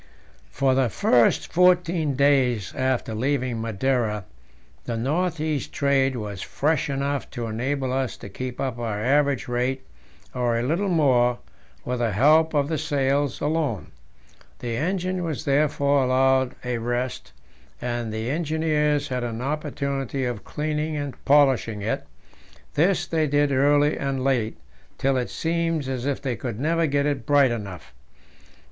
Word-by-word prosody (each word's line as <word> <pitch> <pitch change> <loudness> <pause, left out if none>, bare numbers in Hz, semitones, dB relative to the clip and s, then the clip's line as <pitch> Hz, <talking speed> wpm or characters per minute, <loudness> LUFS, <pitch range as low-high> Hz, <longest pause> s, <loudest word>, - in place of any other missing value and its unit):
For 135 -1 +1
the 130 -2 +2
first 120 +2 +2
fourteen 175 -4 +3
days 130 -7 +2
after 130 -3 -1
leaving 125 0 -1
Madeira 115 -2 -1 0.6
the 115 - -3
north 160 +7 -1
east 155 -3 -2
trade 135 -2 +2
was 105 -5 -5
fresh 150 0 0
enough 140 0 -2
to 120 - -5
enable 130 +4 -2
us 130 -2 -1
to - - -9
keep 125 +5 -6
up 130 -3 -2
our 110 -3 -2
average 140 +3 +2
rate, 125 +2 -1 0.5
or 120 -2 0
a 115 - -1
little 170 +10 0
more, 125 -7 +3 0.5
with 125 0 -2
the 115 -3 0
help 155 - +4
of 140 -1 +2
the 155 -1 -1
sails 140 -2 0
alone. 150 - -1 0.7
The 120 -2 -4
engine 185 +5 -1
was 160 -5 -4
therefore 140 -1 +2
allowed 130 0 +2
a 125 -1 -1
rest, 120 - -3 0.5
and 120 -2 -3
the 110 +1 -3
engineers 155 -2 0
had 125 -1 -2
an 115 -1 -4
opportunity 140 -1 -2
of 120 -4 -4
cleaning 150 0 -2
and 145 -2 -3
polishing 135 -7 +3
it; 110 - -2 0.7
this 175 +4 +2
they 160 -2 0
did 145 0 +2
early 145 +2 +3
and 135 -1 -2
late, 125 -5 0 0.4
till 135 0 +1
it 125 -1 -1
seemed 165 -3 -1
as 130 0 -3
if 140 - -1
they 130 -4 -2
could 120 -3 -5
never 165 +3 +1
get 140 0 +1
it 140 -4 -1
bright 140 -3 +5
enough. 100 -6 -6
135 Hz, 150 wpm, -24 LUFS, 120-150 Hz, 0.7 s, bright